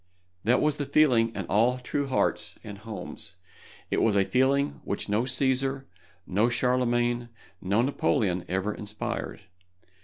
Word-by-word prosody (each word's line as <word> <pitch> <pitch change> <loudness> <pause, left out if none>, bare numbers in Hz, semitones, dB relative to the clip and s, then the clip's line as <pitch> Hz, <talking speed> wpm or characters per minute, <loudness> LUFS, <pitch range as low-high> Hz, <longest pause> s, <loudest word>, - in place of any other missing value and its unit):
That 120 +4 +3
was 150 -1 +1
the 145 - -3
feeling 130 -6 +4
in - - -3
all 115 +5 +2
true 140 +3 -2
hearts 130 - 0
and 100 -2 -8
homes. 105 -4 -6 0.6
It - - +2
was 110 -3 +3
a 100 -1 +4
feeling 135 +4 +1
which 100 - -3
no 105 +4 +1
Cæsar, 135 +1 +1 0.4
no 105 +6 +2
Charlemagne, 120 -1 +1 0.3
no 100 +5 +2
Napoleon 110 - +1
ever 95 +3 -1
inspired. 105 +1 -5
120 Hz, 140 wpm, -27 LUFS, 105-130 Hz, 0.6 s, feeling